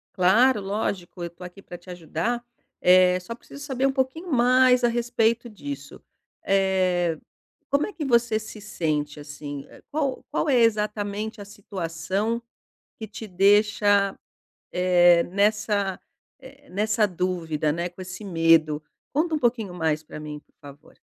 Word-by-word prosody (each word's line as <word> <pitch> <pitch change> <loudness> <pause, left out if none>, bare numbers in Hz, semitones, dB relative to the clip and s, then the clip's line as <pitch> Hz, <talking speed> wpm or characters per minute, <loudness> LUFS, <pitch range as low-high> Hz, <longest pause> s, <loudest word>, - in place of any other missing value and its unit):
Claro, 215 +7 +4
lógico, 195 -3 -3
eu 170 - -3
tô 170 +2 -14
aqui 180 +2 -10
para 175 - -10
te 180 +1 -17
ajudar. 180 +8 -3 0.4
Eh, 180 0 +5
só 185 +6 -7
preciso 280 +3 -12
saber 270 -2 -1
um 270 - +3
pouquinho 270 +6 -2
mais 250 0 +4
a - - +6
respeito 235 0 0
disso. 145 -8 -8 0.4
Eh, 185 -4 +2 0.5
como 280 +1 +2
é 420 - -9
que 315 - -5
você 235 -3 +2
se 215 0 -10
sente 155 -8 -2
assim? 145 -1 -8 0.3
Qual 280 -3 -1
qual 310 - 0
é 270 - +4
exatamente 210 -1 0
a - - -8
situação 195 +2 -3 0.6
que 220 - -6
te 220 +1 -8
deixa, 205 +1 +3 0.5
eh, 175 -1 +5
nessa, 200 0 0 0.4
eh, 270 +2 -16
nessa 215 +2 +1
dúvida, 170 -5 -1
né, 170 +3 -2
com 175 +2 -12
esse 185 +2 -8
medo? 165 -4 +3 0.3
Conta 320 +3 +1
um - - -1
pouquinho 230 -7 0
mais 160 -3 -1
pra 150 - -9
mim, 150 -1 -7
por - - -35
favor. 145 +1 -14
200 Hz, 150 wpm, -25 LUFS, 175-230 Hz, 0.6 s, a